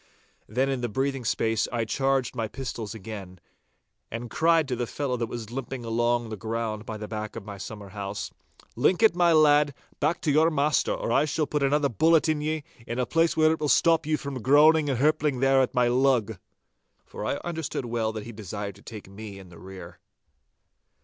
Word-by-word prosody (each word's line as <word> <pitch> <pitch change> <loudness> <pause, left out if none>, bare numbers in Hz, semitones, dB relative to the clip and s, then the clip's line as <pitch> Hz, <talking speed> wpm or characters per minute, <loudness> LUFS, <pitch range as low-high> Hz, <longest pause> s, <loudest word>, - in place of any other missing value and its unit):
Then 130 +5 0
in 135 -2 -1
the 120 - -2
breathing 135 +3 -1
space 115 -1 0
I 115 -2 -1
charged 135 +1 0
my 115 -2 -2
pistols 115 -3 -6
again, 95 -4 -8 0.7
and 115 +1 -6
cried 165 -2 +3
to 130 - -1
the 120 0 -3
fellow 140 -1 -2
that 115 -1 -2
was 115 -2 -6
limping 130 -1 -5
along 120 0 0
the 110 - -4
ground 110 0 -4
by 110 - -5
the 105 0 -6
back 110 -1 -5
of - - -7
my 100 -2 -8
summer 100 +1 -8
house,— 100 0 -5 0.4
'Link 175 - +2
it, 220 -6 +6
my 175 -1 +4
lad, 150 -3 +4 0.2
back 160 +4 +1
to 150 - +1
your 155 +3 +4
master, 150 -1 +1
or - - -2
I 135 +5 +3
shall 155 0 -1
put 150 0 -2
another 140 +1 +2
bullet 160 +7 +3
in 155 -1 0
ye, 155 0 -2 0.2
in 120 - -4
a 125 - +1
place 165 +3 +1
where 155 0 +5
it 160 - -1
will 150 - -1
stop 165 -1 +3
you 155 0 +2
from 140 -4 -6
groaning 150 +4 +5
and 135 - 0
hirpling 150 -1 +2
there 135 0 +4
at 130 - -1
my 125 -1 +4
lug!' 120 -5 +2 0.7
For - - -8
I - - -1
understood 160 -6 -4
well 115 -2 -1
that 110 -1 -6
he 115 - -7
desired 105 -1 -6
to - - -17
take 105 -3 -10
me 100 0 -9
in 95 -2 -12
the 85 - -14
rear. 95 -2 -11
125 Hz, 210 wpm, -26 LUFS, 110-150 Hz, 0.7 s, it